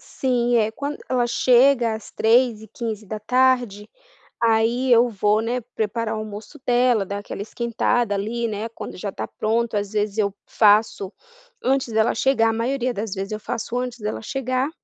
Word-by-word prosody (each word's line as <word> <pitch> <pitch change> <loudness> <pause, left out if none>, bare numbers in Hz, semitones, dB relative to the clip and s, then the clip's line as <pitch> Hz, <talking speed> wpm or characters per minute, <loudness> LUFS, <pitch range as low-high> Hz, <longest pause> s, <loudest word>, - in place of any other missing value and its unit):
Sim, 245 -2 0
eh, 220 -1 +2
quando 285 +5 -5
ela 250 -2 +1
chega, 245 -1 +4
às 220 - -9
15h15, 225 0 +1 0.5
aí 230 +3 +2
eu 240 +1 +6
vou, 210 0 +1
né, 240 +2 -2
preparar 220 +1 -1
o 215 - -3
almoço 215 +2 -8
dela, 245 -4 +3
dar 200 +1 -4
aquela 205 - -7
esquentada, 235 -1 0
ali, 230 +4 -2
né, 215 +1 -4
quando 225 - -8
já 200 +2 -4
está - - -5
pronto. 225 0 -1
Às 205 0 -3
vezes 210 0 -1
eu 200 -2 +1
faço 210 -2 +3 0.5
antes 260 -3 0
dela 220 +1 +2
chegar 225 -2 +3
a - - 0
maioria 245 +2 -1
das 210 -1 -4
vezes 195 +1 -5
eu 215 - -4
faço 235 +2 -4
antes 250 -1 -3
dela 210 0 -4
chegar, 255 +3 -1
225 Hz, 160 wpm, -22 LUFS, 215-245 Hz, 0.5 s, eu